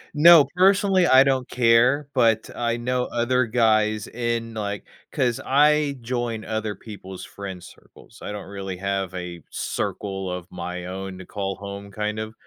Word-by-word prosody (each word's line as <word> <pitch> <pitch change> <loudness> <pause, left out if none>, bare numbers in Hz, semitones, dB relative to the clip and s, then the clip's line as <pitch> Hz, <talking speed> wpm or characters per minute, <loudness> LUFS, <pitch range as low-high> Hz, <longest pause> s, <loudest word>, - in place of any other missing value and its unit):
No, 165 -1 +8
personally, 190 0 +4
I 130 -3 +7
don't 130 -2 0
care, 125 +4 +3
but 115 -3 +2
I 120 -1 -1
know 125 +1 -1
other 125 +1 +1
guys 110 -2 +2
in, 115 -1 -3
like 100 -2 -4 0.3
'cause 120 -3 0
I 145 +1 +3
join 120 -2 -3
other 110 -1 -3
people's 95 -4 -10
friend 95 -3 -8
circles, - - -17
I - - -6
don't 105 -2 -7
really 95 -2 -6
have 95 -1 -2
a 90 -3 -7
circle 95 -2 -3
of 90 -1 -6
my 90 0 -6
own 95 +1 -6
to 95 - -9
call 95 -1 -4
home, 100 0 -8
kind 105 +1 -3
of. 110 0 -5
110 Hz, 160 wpm, -23 LUFS, 95-125 Hz, 0.3 s, No